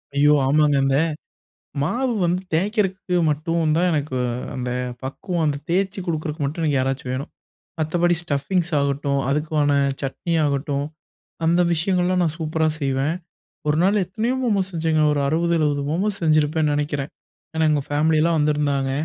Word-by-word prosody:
ஐயோ! 145 +1 +5
ஆமாங்க, 150 +1 +3
இந்த 135 0 +2 0.9
மாவு 245 - 0
வந்து 175 +2 0
தேக்கறதுக்கு 190 -1 0
மட்டும் 155 +1 0
தான், 180 +2 +3
எனக்கு 145 -4 -1 0.4
அந்தப் 125 0 -3
பக்குவம். 175 +6 -3
வந்தத் 145 -1 -2
தேச்சு 195 +2 0
குடுக்குறதுக்கு 155 -2 -2
மட்டும் 155 +4 -3
எனக்கு 145 -4 +2
யாராச்சும் 130 0 -2
வேணும். 135 +3 -4 0.5
மத்தபடி 175 +2 +2
ஸ்டப்பிங்ஸ் 170 +4 -1
ஆகட்டும். 140 0 0
அதுக்குவான 150 0 +1 0.3
சட்னி 140 +5 -3
ஆகட்டும். 140 0 -1 0.6
அந்த 170 +2 +3
விஷயங்கள்லாம் 180 +2 +1
நான் 160 -2 -1
சூப்பரா 160 0 0
செய்வேன். 135 +2 0 0.5
ஒரு 150 - +2
நாள் 200 +1 +3
எத்தனயோ 220 +8 -1
மோமோஸ் 200 -5 0
செஞ்சேங்க. 160 -1 +1
ஒரு 145 - 0
60வது, 165 +4 +1
70வது 145 -2 +1
மோமோஸ் 200 +6 -1
செஞ்சுருப்பேன்னு 155 -1 +2
நெனைக்கிறேன். 145 -1 -2 0.5
ஏன்னா 160 0 +2
எங்க 150 -2 +2
ஃபம்லி 155 +2 +2
எல்லாம் 165 +1 +2
வந்துருந்தாங்க. 145 -2 +1
155 Hz, 140 wpm, -22 LUFS, 145-175 Hz, 0.9 s, ஐயோ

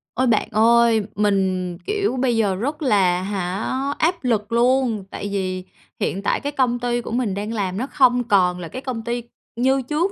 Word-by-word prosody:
Ôi, 260 +1 +1
bạn 225 -3 +2
ơi, 230 0 +4
mình, 190 -4 0
kiểu, 410 -8 -1
bây 250 -2 +1
giờ 205 -4 +2
rất 285 - -3
là, 190 -9 +2
hả, 190 0 -3 0.3
áp 340 +1 0
lực 225 -4 0
luôn. 240 -2 +2
Tại 205 - -5
vì 185 -2 -2 0.4
hiện 195 - -1
tại - - +1
cái 285 0 -3
công 250 -4 +1
ty 240 0 -1
của - - -7
mình 230 -4 0
đang 210 +3 -4
làm 195 -4 -2
nó 255 +5 -2
không 250 -4 +3
còn 185 -5 +2
là 170 - -6
cái 255 - -7
công 250 -4 -4
ty 240 +1 -3 0.3
như 265 +3 +2
trước 305 +9 -1
230 Hz, 195 wpm, -21 LUFS, 195-255 Hz, 0.4 s, ơi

